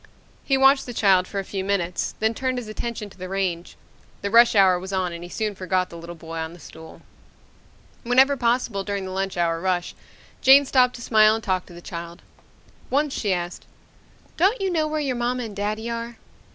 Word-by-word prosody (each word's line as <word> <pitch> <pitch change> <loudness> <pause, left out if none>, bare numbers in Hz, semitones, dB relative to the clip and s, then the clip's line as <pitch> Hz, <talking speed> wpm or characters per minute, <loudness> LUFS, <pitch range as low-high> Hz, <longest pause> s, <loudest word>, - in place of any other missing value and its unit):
He 270 - +1
watched 270 0 +4
the 245 - -7
child 190 -4 +3
for 200 - -7
a 195 - -1
few 190 0 -4
minutes, 185 -3 -2
then 220 +1 +1
turned 255 +2 -2
his 245 -3 -5
attention 215 -1 -5
to 185 - -18
the 185 0 -6
range. 185 -3 -3 0.5
The 200 - -2
rush 235 0 +6
hour 190 -3 +5
was 190 +2 -7
on 185 -2 -1
and 170 0 -8
he 175 - -9
soon 215 +2 -2
forgot 185 -1 -1
the - - -10
little 170 +1 -9
boy 165 0 -8
on 160 +1 -5
the 175 - -14
stool... 160 +1 -13 1.0
Whenever 260 +4 +4
possible 235 -5 0
during 200 -1 -3
the 185 - -6
lunch 190 0 -3
hour 165 -1 0
rush, 180 -1 -1 0.5
Jane 275 +1 +7
stopped 250 -2 +3
to 235 - -9
smile 215 -1 +5
and 225 - -6
talk 185 -2 -1
to - - -13
the 175 - -11
child. 170 0 -8 0.7
Once 285 +1 +1
she 205 - -1
asked, 175 -1 -4 0.7
"Don't 390 +9 +3
you 385 -1 -1
know 315 -3 +1
where 310 0 -2
your 275 -4 -1
mama 245 +1 -1
and 215 -3 -7
daddy 215 +3 -3
are?" 235 0 -5
205 Hz, 210 wpm, -23 LUFS, 180-245 Hz, 1.0 s, Jane